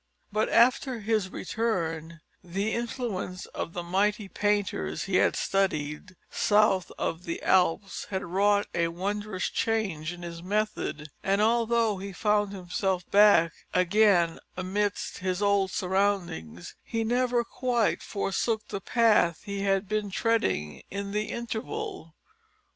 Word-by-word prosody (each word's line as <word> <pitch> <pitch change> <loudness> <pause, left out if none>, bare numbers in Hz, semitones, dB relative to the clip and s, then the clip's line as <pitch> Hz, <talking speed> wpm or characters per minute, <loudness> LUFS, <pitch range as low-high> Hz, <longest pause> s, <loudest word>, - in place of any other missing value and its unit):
But, 215 +1 +1
after 250 0 +3
his 215 -2 0
return, 170 -7 -3 0.2
the 195 +5 -2
influence 230 -6 -3
of 165 - -6
the 175 - -4
mighty 205 +4 0
painters 205 0 -1
he 190 -1 +1
had - - +3
studied 185 -2 -1 0.2
south 205 -3 +3
of 165 +2 -3
the 165 - -3
Alps 190 +1 +2
had 190 -1 -3
wrought 200 +3 +2
a 170 -1 +1
wondrous 195 +3 -3
change 195 -8 -1
in 175 0 -9
his 170 -1 -7
method, 195 -6 -2
and 195 +1 +1
although 230 -1 +2
he 195 0 -6
found 210 +1 +1
himself 185 -1 -2
back 200 -5 +6 0.2
again 180 -2 +4 0.2
amidst 200 +2 -2
his 185 0 -1
old 200 -2 +2
surroundings 185 - -1
he 225 -1 -2
never 245 +1 +1
quite 240 -2 0
forsook 215 +2 -2
the 200 -2 -4
path 210 -7 +3
he 200 -1 -4
had 195 0 +1
been 210 0 -1
treading 195 - 0
in 200 0 -4
the 210 +1 0
interval. 235 - -5
200 Hz, 130 wpm, -28 LUFS, 180-215 Hz, 0.2 s, back